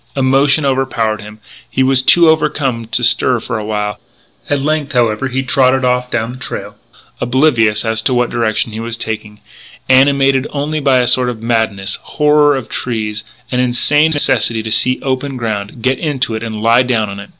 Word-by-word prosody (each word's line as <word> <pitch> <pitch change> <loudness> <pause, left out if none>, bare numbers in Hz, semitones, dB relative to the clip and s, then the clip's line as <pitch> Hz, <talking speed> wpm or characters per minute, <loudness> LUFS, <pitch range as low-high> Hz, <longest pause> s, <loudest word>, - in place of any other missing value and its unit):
Emotion 135 +2 +3
overpowered 125 -5 -1
him. 105 +1 -11 0.3
He 130 +3 0
was 130 0 +3
too 170 +5 +5
overcome 145 -6 0
to 120 +2 -1
stir 120 +1 +3
for 115 0 -4
a - - -5
while. 105 -1 -3 0.5
At 145 - +1
length, 150 +1 -2
however, 120 0 +1
he 130 +1 -2
tottered 130 0 +2
off 125 0 0
down 115 -1 -2
the 125 - -10
trail, 105 -5 -7 0.4
oblivious 120 -4 +2
as 110 0 0
to 130 - 0
what 120 0 0
direction 115 -1 -1
he 110 - -6
was 115 0 -4
taking, 110 -2 -6 0.5
animated 135 0 +3
only 150 +2 -3
by 135 -3 +3
a - - 0
sort 125 0 +2
of 115 -2 -7
madness 110 -4 -1
horror 150 -1 +2
of 130 -4 -5
trees 110 -3 -4 0.3
an 125 - 0
insane 135 +5 +3
necessity 115 -6 +1
to 110 - -5
see 130 +4 +1
open 135 0 -3
ground, 110 -1 -5
get 130 +1 +1
into 135 -7 -2
it, 110 - -4
and 110 -2 -5
lie 115 +2 +4
down 120 -4 0
on 100 0 -7
it. 100 - -10
125 Hz, 185 wpm, -15 LUFS, 110-135 Hz, 0.5 s, too